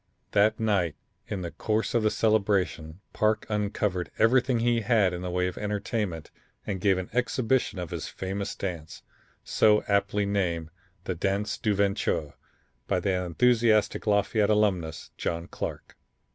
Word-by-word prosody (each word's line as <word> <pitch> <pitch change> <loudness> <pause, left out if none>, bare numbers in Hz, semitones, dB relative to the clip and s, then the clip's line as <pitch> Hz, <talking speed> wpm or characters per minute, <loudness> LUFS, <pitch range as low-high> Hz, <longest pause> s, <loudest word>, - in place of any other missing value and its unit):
That 105 +2 +3
night 100 -8 +1 0.3
in 95 -3 -4
the 85 - -4
course 110 0 -1
of 120 - +3
the 110 - +3
celebration 100 -7 0
Parke 110 0 +1
uncovered 105 -3 -1
everything 125 +2 +3
he 120 0 +2
had 105 -5 +3
in 90 - -4
the 90 - -3
way 90 0 0
of 90 - -4
entertainment 105 -4 -3 0.3
and 95 -3 -3
gave 95 -2 +3
an 95 -1 -5
exhibition 125 -2 +1
of 90 -3 -5
his - - -4
famous 95 +1 -4
dance, 85 -5 -6 0.4
so 105 -1 +3
aptly 100 0 +1
named 85 -5 -1 0.3
the 95 - -2
'dance 100 +4 -1
du 105 -3 +1
venture,' 100 -6 0 0.5
by 95 - +1
that 90 0 0
enthusiastic 110 +2 +2
Lafayette 105 0 +2
alumnus, 95 -7 0
John 85 0 -2
Clarke. - - -6
100 Hz, 145 wpm, -27 LUFS, 90-110 Hz, 0.5 s, That